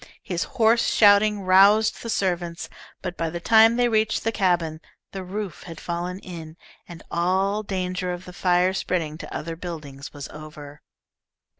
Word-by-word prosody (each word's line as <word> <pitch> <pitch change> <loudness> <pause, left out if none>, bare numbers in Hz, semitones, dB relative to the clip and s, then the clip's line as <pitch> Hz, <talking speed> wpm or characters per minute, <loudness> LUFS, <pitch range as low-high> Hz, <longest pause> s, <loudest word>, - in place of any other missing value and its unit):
His 180 -6 -2
hoarse 230 0 +4
shouting 205 0 +5
roused 200 +4 +5
the 230 - -6
servants, 175 -5 -2 0.3
but 180 -2 -4
by 165 -1 -2
the 170 +2 -5
time 225 +4 +5
they 245 0 +3
reached 220 -1 +1
the 225 - 0
cabin 175 -6 0 0.3
the 190 -1 -6
roof 195 -1 -6
had 165 -3 -9
fallen 175 +1 -4
in, 165 -4 -10 0.3
and 170 -2 -11
all 190 +4 +1
danger 185 -2 -3
of 175 +1 -6
the 180 - -10
fire 180 +1 +2
spreading 165 -5 -2
to - - -9
other 165 +1 -5
buildings 155 -5 -8
was 145 -1 -8
over. 150 -1 -11
180 Hz, 160 wpm, -24 LUFS, 170-205 Hz, 0.3 s, shouting